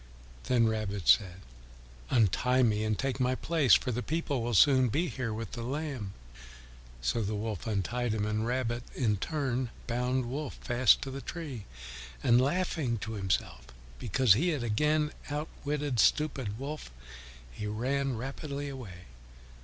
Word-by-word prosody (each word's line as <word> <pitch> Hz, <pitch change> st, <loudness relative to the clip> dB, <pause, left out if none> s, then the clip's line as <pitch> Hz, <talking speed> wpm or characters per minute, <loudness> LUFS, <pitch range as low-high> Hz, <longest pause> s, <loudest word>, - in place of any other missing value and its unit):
Then 120 Hz, -3 st, +3 dB
Rabbit 105 Hz, -6 st, -2 dB
said, 90 Hz, +9 st, +4 dB, 0.7 s
"Untie 125 Hz, +3 st, +3 dB
me 110 Hz, -2 st, +2 dB
and 110 Hz, -1 st, 0 dB
take 135 Hz, 0 st, -2 dB
my 130 Hz, 0 st, +2 dB
place, 155 Hz, -4 st, +4 dB
for 125 Hz, -, 0 dB
the 125 Hz, +1 st, -2 dB
people 145 Hz, -2 st, -1 dB
will 120 Hz, 0 st, -1 dB
soon 130 Hz, +2 st, +6 dB
be 165 Hz, +10 st, 0 dB
here 125 Hz, -4 st, -3 dB
with 110 Hz, -1 st, -5 dB
the 120 Hz, -, -5 dB
lamb." 130 Hz, -5 st, -4 dB, 0.9 s
So 115 Hz, -, +1 dB
Wolf 105 Hz, +1 st, -3 dB
untied 110 Hz, +3 st, -1 dB
him, 105 Hz, -1 st, 0 dB
and 105 Hz, +1 st, -1 dB
Rabbit 120 Hz, 0 st, -1 dB
in 110 Hz, -5 st, +1 dB
turn 130 Hz, -, -1 dB, 0.2 s
bound 125 Hz, +1 st, 0 dB
Wolf 140 Hz, +4 st, -4 dB
fast 120 Hz, 0 st, +3 dB
to 135 Hz, -, -5 dB
the 135 Hz, +1 st, -6 dB
tree, 140 Hz, -, -6 dB, 0.6 s
and 120 Hz, +1 st, +5 dB
laughing 145 Hz, -4 st, 0 dB
to 110 Hz, +1 st, -5 dB
himself 95 Hz, -, -2 dB, 0.3 s
because 120 Hz, -, +4 dB
he 160 Hz, -, +2 dB
had 150 Hz, -7 st, -1 dB
again 150 Hz, +7 st, +1 dB, 0.2 s
outwitted 145 Hz, -2 st, -3 dB
stupid 130 Hz, -9 st, +2 dB
Wolf, 145 Hz, -, -6 dB, 0.6 s
he 105 Hz, +12 st, -5 dB
ran 130 Hz, +4 st, -1 dB
rapidly 140 Hz, +3 st, -5 dB
away. 100 Hz, -10 st, -9 dB
125 Hz, 145 wpm, -30 LUFS, 110-140 Hz, 0.9 s, soon